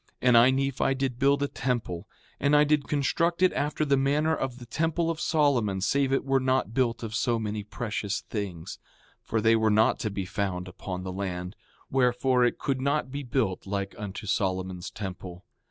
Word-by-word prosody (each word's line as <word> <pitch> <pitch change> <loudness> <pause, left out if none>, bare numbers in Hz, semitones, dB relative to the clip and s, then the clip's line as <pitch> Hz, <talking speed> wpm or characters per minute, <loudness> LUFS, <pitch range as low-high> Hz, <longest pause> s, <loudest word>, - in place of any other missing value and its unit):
5:16 - - -45
And 120 - +7
I, 120 +2 +6
Nephi, 135 0 +1
did 130 -2 -2
build 140 +1 +3
a - - +1
temple; 120 -12 -3 0.3
and 145 +1 +3
I 150 - +6
did 150 -1 +1
construct 165 +5 +1
it 185 - +5
after 150 +1 -1
the 140 -1 +3
manner 150 +4 +2
of 130 -4 -3
the 125 - -10
temple 165 +6 0
of 165 0 -5
Solomon 130 - +2
save 135 +7 +1
it 135 - +1
were 135 0 +2
not 130 -4 0
built 120 -2 0
of 110 -1 -5
so 115 +1 +1
many 105 -1 -3
precious 105 -2 -3
things; 95 -7 -6 0.4
for 115 - -1
they 115 +1 +5
were 110 -1 +3
not 110 +1 +3
to 110 - -1
be 100 -2 -4
found 90 -1 -3
upon 90 0 -6
the 95 0 -5
land, 90 -1 -4 0.4
wherefore, 125 0 +3
it 120 - +2
could 135 -2 -2
not 140 -1 0
be 140 +1 -4
built 120 -8 -1
like 100 0 -3
unto 105 -1 -6
Solomon's 95 -3 -1
temple. 90 -2 -7
120 Hz, 195 wpm, -27 LUFS, 100-140 Hz, 0.4 s, And